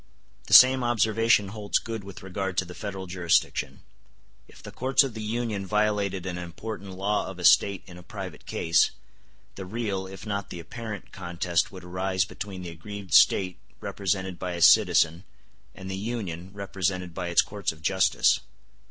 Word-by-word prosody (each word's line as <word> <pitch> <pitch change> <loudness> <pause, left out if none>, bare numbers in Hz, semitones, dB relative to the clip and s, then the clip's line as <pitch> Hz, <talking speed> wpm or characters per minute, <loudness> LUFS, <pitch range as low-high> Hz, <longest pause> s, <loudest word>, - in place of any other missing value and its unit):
*t - - -31
The - - -2
same 130 0 +8
observation 110 -2 +2
holds 105 0 -1
good 115 -3 -5
with 100 +1 -11
regard 95 -1 -4
to 95 - +2
the 90 - -10
Federal 95 -1 -6
jurisdiction. 85 -2 0 0.7
If - - -17
the - - -9
courts 130 +3 +3
of 135 -4 -4
the 110 - -6
Union 110 -2 -2
violated 105 -2 0
an 90 -1 -4
important 95 +3 -7
law 100 +3 -1
of 95 - -8
a 90 - -8
State 95 +2 +5
in 90 -1 -12
a - - -12
private 95 -2 -9
case, 85 0 +2 0.6
the 95 - -8
real, 100 -3 -3
if 95 +1 -10
not 100 -2 -3
the 85 - -7
apparent, 110 +4 -8
contest 85 -2 -1
would 95 -2 -10
arise 95 +1 -1
between 100 -3 -7
the 90 - -6
aggrieved 95 +3 -8
State 90 -2 +5 0.2
represented 95 -2 -2
by 90 -1 -3
a 85 - -5
citizen 85 +2 +5 0.5
and 95 - -9
the 95 - -3
Union 95 -5 -4
represented 95 -3 -3
by 90 0 -4
its 85 - +4
courts 100 -1 -3
of 80 -1 -16
justice. 95 +2 +3
95 Hz, 175 wpm, -26 LUFS, 90-105 Hz, 0.7 s, same